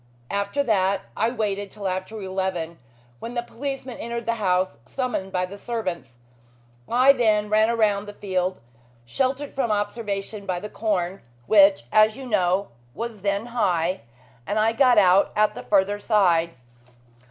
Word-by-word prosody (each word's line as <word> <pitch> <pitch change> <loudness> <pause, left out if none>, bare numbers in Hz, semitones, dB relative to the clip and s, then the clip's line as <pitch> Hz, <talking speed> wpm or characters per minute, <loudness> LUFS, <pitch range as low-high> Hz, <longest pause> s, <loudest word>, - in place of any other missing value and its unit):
After 200 +8 0
that 195 -5 +1
I 225 +2 +1
waited 205 -4 -2
till 200 -1 -6
after 185 +4 -4
eleven, 185 -4 -3 0.4
when 235 - -7
the 240 - -1
policeman 265 0 -6
entered 235 0 -4
the 230 - +1
house, 185 -1 +1
summoned 195 - -3
by 185 -1 0
the 200 +2 -10
servants. 185 - -4 0.7
I 255 +3 +6
then 215 -4 +2
ran 215 +1 +4
round 205 -2 +1
the 205 - -8
field, 185 -2 -2 0.5
sheltered 265 - -2
from 265 -4 -1
observation 205 -1 -3
by 180 -2 -1
the 210 - -7
corn, 195 -4 -2 0.2
which, 195 - +5
as 215 +2 +4
you 270 - -8
know, 195 -3 +1 0.3
was 230 -3 -5
then 200 +2 -1
high, 180 -6 +1 0.5
and 210 - -1
I 220 +1 +3
got 250 0 +4
out 190 -1 +5
at 215 0 +3
the - - -7
further 205 0 +1
side. 175 -6 +2
205 Hz, 155 wpm, -24 LUFS, 190-230 Hz, 0.7 s, I